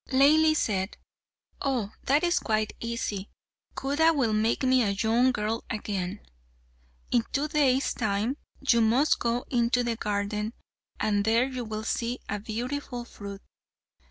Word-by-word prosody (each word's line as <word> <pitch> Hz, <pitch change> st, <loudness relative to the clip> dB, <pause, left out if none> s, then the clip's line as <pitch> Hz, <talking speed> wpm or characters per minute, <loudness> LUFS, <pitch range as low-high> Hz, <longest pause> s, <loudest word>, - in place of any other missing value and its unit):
Laili 310 Hz, +4 st, +5 dB
said, 190 Hz, -5 st, -1 dB, 0.6 s
"Oh, 245 Hz, -7 st, -1 dB
that 285 Hz, +4 st, +3 dB
is 350 Hz, 0 st, +3 dB
quite 215 Hz, -1 st, 0 dB
easy. 225 Hz, -4 st, -3 dB, 0.5 s
Khuda 295 Hz, +5 st, +3 dB
will 240 Hz, -6 st, +1 dB
make 220 Hz, +4 st, +1 dB
me 260 Hz, 0 st, +4 dB
a 215 Hz, -, +2 dB
young 235 Hz, +3 st, +3 dB
girl 220 Hz, 0 st, -2 dB
again. 200 Hz, -2 st, -3 dB, 0.9 s
In 240 Hz, -2 st, +3 dB
two 285 Hz, +2 st, 0 dB
days' 280 Hz, -4 st, +2 dB
time 220 Hz, +4 st, -1 dB, 0.3 s
you 235 Hz, -2 st, +5 dB
must 240 Hz, +7 st, +3 dB
go 235 Hz, +1 st, -1 dB
into 245 Hz, 0 st, +2 dB
the 235 Hz, -1 st, -1 dB
garden, 210 Hz, +1 st, -2 dB, 0.5 s
and 205 Hz, -2 st, +1 dB
there 225 Hz, +3 st, +3 dB
you 255 Hz, -2 st, -4 dB
will 215 Hz, -1 st, -5 dB
see 235 Hz, +2 st, -1 dB
a 205 Hz, -, -2 dB
beautiful 240 Hz, +3 st, -4 dB
fruit. 200 Hz, -3 st, -9 dB
235 Hz, 140 wpm, -27 LUFS, 215-260 Hz, 0.9 s, Laili